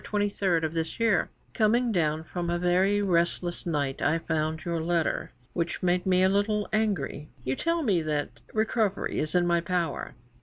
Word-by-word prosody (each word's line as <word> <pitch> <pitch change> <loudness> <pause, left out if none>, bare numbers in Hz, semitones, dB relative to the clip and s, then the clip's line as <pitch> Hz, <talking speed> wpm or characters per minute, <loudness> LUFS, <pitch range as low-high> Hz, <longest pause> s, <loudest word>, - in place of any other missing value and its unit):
23 200 -5 0
of 160 0 -1
this 165 +3 -3
year: 225 -3 +2 0.2
'"Coming 235 +2 +2
down 160 -4 +1
from 170 +2 -4
a 175 - +1
very 185 +4 +2
restless 175 -1 0
night 145 -4 -1
I 160 - +2
found 160 -1 -2
your 170 -1 -1
letter, 165 0 0 0.2
which 175 +1 -2
made 180 +1 +1
me 185 0 +4
a - - +6
little 205 +2 +1
angry. 195 -9 -1
You 130 +1 -1
tell 335 - 0
me 195 - +2
that 150 -2 -2
recovery 220 -2 0
is 155 +3 -1
in 175 -1 +4
my 170 -1 +2
power. 175 -1 -2
175 Hz, 175 wpm, -27 LUFS, 160-205 Hz, 0.2 s, a